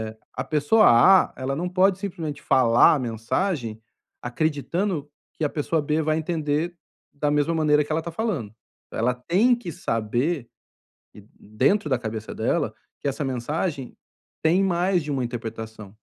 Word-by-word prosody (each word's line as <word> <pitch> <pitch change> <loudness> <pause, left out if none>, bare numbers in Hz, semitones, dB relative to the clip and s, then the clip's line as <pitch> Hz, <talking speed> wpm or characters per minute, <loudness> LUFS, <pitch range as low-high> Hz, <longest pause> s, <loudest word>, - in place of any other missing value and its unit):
Eh, - - -34
a - - -3
pessoa 155 +9 +3
A, 180 +12 +6
ela 135 +1 -3
não 175 +5 -2
pode 185 +1 +3
simplesmente 170 -7 -5
falar 120 0 +5
a - - -1
mensagem, 115 - -2 0.4
acreditando 155 +5 -2 0.2
que 160 - -5
a 150 - +2
pessoa 155 +2 -1
B 150 +2 0
vai 155 +1 +1
entender 160 +1 -1 0.4
da 145 0 -1
mesma 150 +3 +1
maneira 150 -2 +3
que 145 - -8
ela 160 +1 +1
tá 170 - -6
falando. 165 - -3 0.4
Ela 120 +3 0
tem 180 - +2
que 235 -8 -7
saber 120 +4 -1 0.7
e - - -13 0.2
dentro 135 - +1
da 130 - +2
cabeça 110 -2 -6
dela, - - 0 0.3
que - - -2
essa 140 +2 -2
mensagem 135 +3 -3 0.5
tem 170 +4 +4
mais 180 -1 +1
de 150 - -7
uma 135 -3 -1
interpretação. 110 -3 -7
150 Hz, 155 wpm, -24 LUFS, 120-170 Hz, 0.7 s, A